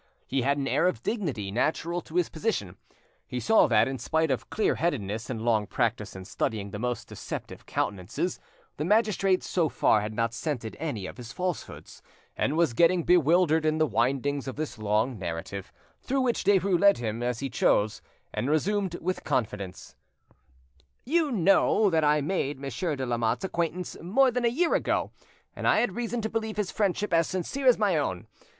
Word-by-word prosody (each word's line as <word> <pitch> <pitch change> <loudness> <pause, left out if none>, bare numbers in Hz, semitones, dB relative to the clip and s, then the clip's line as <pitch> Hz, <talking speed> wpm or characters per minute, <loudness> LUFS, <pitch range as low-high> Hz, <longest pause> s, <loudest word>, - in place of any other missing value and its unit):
He 135 0 -1
had 140 +3 +1
an 140 -1 -2
air - - +2
of 120 -10 -2
dignity 145 - -2
natural 165 - 0
to 160 - -13
his 180 -2 +3
position. 155 - -2 0.5
He 125 - -3
saw 220 - +4
that, - - +4
in 135 -1 -4
spite 160 -2 +1
of 130 - -2
clear 220 - +1
headedness 115 - -2
and 115 -3 -4
long 110 -3 +2
practice 115 -4 -1
in 95 -1 -8
studying 100 0 -3
the 105 - -5
most 125 +1 -3
deceptive - - -7
countenances, 100 - -2 0.4
the 150 - -2
magistrate 195 -1 +2
so 165 -4 0
far 110 - +3
had 105 +1 -5
not 115 0 0
scented 120 -4 -4
any 120 -12 -3
of - - -8
his 120 -1 -8
falsehoods, 180 +2 -5 0.3
and 150 +4 0
was 165 -7 +3
getting 170 +6 +4
bewildered 170 -1 +4
in 155 0 +1
the 155 - +3
windings 140 +1 0
of 130 - -4
this 145 -6 -5
long 110 +3 0
narrative, 90 +2 -5 0.3
through 270 +1 0
which 245 -3 0
Derues 195 -2 +3
led 200 0 +6
him 115 -1 -3
as 120 -1 -1
he 140 - -2
chose; 105 -4 +1 0.3
and - - -2
he - - -1
resumed 190 +4 0
with 185 +2 -2
confidence— 105 - -3 1.1
"You 310 +2 +2
know 195 0 +4
that 160 -1 +2
I 150 0 +3
made 145 -4 -1
Monsieur 140 - -2
de 130 -1 -3
Lamotte's 120 +6 0
acquaintance 175 0 -2
more 250 +10 +3
than 245 0 -1
a 235 +1 +1
year 345 -1 +3
ago, - - 0 0.4
and - - -2
I - - +5
had 195 -6 0
reason 235 -1 -2
to 220 - -1
believe 220 -1 -3
his 205 -3 -1
friendship 205 -1 0
as 165 -1 +4
sincere 225 +10 -2
as 250 - +7
my 200 -6 +2
own. 95 -12 -2
155 Hz, 185 wpm, -27 LUFS, 115-190 Hz, 1.1 s, as